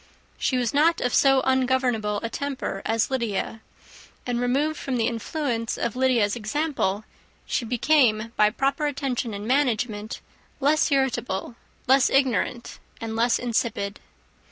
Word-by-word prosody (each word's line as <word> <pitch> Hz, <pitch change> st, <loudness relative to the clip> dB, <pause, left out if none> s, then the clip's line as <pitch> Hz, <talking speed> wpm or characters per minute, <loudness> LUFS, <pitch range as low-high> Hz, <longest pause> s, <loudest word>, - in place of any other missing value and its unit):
She 255 Hz, -, +1 dB
was 245 Hz, -2 st, 0 dB
not 320 Hz, +4 st, +3 dB
of 245 Hz, -, -1 dB
so 270 Hz, -1 st, +5 dB
ungovernable 255 Hz, -5 st, +1 dB
a 230 Hz, -, -2 dB
temper 270 Hz, -8 st, -4 dB
as 225 Hz, +3 st, 0 dB
Lydia; 225 Hz, -3 st, -2 dB, 0.6 s
and, 245 Hz, -1 st, -1 dB
removed 285 Hz, +5 st, 0 dB
from 265 Hz, -3 st, -2 dB
the 225 Hz, -, +1 dB
influence 230 Hz, 0 st, -2 dB
of 235 Hz, -, -2 dB
Lydia's 245 Hz, -5 st, +2 dB
example, 220 Hz, -3 st, -1 dB, 0.4 s
she 235 Hz, -, -1 dB
became, 230 Hz, -2 st, +2 dB
by 210 Hz, 0 st, +4 dB
proper 275 Hz, +6 st, 0 dB
attention 265 Hz, -5 st, -2 dB
and 200 Hz, +1 st, -6 dB
management, 235 Hz, -5 st, 0 dB, 0.4 s
less 295 Hz, +2 st, +2 dB
irritable, 250 Hz, -6 st, -1 dB, 0.3 s
less 265 Hz, +1 st, +4 dB
ignorant, 255 Hz, -2 st, 0 dB, 0.2 s
and 225 Hz, -1 st, -5 dB
less 235 Hz, +1 st, +2 dB
insipid. 225 Hz, -4 st, -2 dB
245 Hz, 130 wpm, -25 LUFS, 225-270 Hz, 0.6 s, so